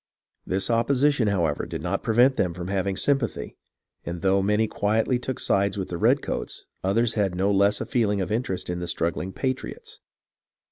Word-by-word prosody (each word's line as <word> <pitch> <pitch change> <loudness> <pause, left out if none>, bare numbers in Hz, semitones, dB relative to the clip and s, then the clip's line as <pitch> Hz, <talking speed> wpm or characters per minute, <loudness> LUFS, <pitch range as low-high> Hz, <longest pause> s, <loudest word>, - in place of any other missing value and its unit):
This 95 +4 0
opposition, 130 +2 +2
however, 85 -7 0
did - - -5
not - - -1
prevent 125 +4 +4
them 90 -7 0
from 90 0 -5
hav 95 -1 0
ing 95 -1 -1
sympathy, 135 -5 0 0.5
and 85 0 -5
though 95 0 +3
many 105 +3 +2
quietly 110 +5 +1
took 125 0 -4
sides 100 0 +1
with 95 - -3
the 85 - -3
redcoats, - - 0 0.2
others 110 +5 +2
had 100 -4 0
no 95 +3 +1
less 100 +1 +3
a - - -2
feeling 105 -5 +1
of 95 - -2
interest 110 -5 -2
in 90 0 -3
the 90 - -4
struggling 85 +2 -2
patriots. 130 +6 -4
100 Hz, 180 wpm, -25 LUFS, 95-115 Hz, 0.5 s, prevent